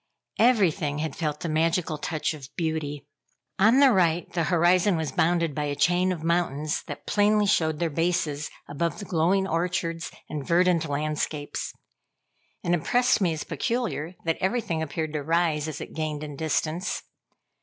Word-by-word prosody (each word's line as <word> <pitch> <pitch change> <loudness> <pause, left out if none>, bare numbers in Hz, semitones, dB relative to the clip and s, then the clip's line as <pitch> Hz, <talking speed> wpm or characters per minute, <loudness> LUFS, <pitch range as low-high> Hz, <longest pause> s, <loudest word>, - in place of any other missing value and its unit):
Everything 190 - +3
had 155 -2 -3
felt 150 -3 -3
the - - -2
magical 160 0 0
touch 155 +1 -2
of 140 -3 -10
beauty. 155 -4 -2 0.5
On 220 +7 +6
the 275 -2 +7
right, 175 -4 +2
the 170 -2 +1
horizon 175 +2 +3
was 160 -4 -2
bounded 170 +1 +1
by 150 0 -2
a 145 -1 -2
chain 180 +5 +2
of 165 -4 -4
mountains, 160 -3 0
that 145 - -7
plainly 210 0 +3
showed 160 -5 +2
their 165 0 -1
bases 155 -2 0 0.2
above 150 +3 -2
the 200 - -7
glowing 185 +3 +2
orchards 165 -1 -1 0.2
and 150 -2 -4
verdant 170 -1 +2
landscapes. 150 0 -2 0.9
It 170 - 0
impressed 245 - +2
me 175 -4 +2
as 155 - -4
peculiar, 180 - -2
that 165 -1 0
everything 190 -5 0
appeared 155 0 -3
to 150 - -1
rise 160 -1 +1
as 155 - -5
it - - -8
gained 155 -1 -3
in 145 -1 -6
distance. 160 +3 -1
165 Hz, 160 wpm, -26 LUFS, 150-180 Hz, 0.9 s, the